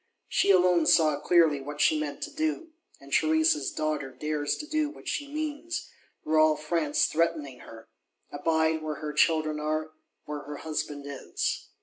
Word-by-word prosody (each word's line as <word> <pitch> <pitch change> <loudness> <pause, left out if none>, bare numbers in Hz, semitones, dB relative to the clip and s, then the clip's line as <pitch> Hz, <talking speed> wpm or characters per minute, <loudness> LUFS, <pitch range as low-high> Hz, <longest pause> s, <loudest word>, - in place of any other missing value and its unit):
She - - +1
alone 180 -3 +5
saw 155 -3 +4
clearly 160 -5 +3
what 145 +2 -7
she 155 +1 +4
meant 150 -2 -4
to 305 - -5
do; 315 +1 -2 0.3
and - - -12
Theresa's 315 0 +3
Daughter 155 -3 -2
dares 145 +3 -2
do 305 0 -1
what 300 - -13
she 290 - -2
means, 310 +3 -4 0.3
were 155 0 +2
all 155 0 +5
France 155 -1 0
threatening 155 -5 -1
her: 115 -1 -13 0.4
abide 160 +2 +1
where 155 -1 -3
her 150 0 -5
children 155 -1 +2
are, 155 +1 -2 0.3
where 150 0 -5
her 145 0 -8
husband 150 -2 -4
is. 140 -1 -3
155 Hz, 155 wpm, -28 LUFS, 150-180 Hz, 0.4 s, alone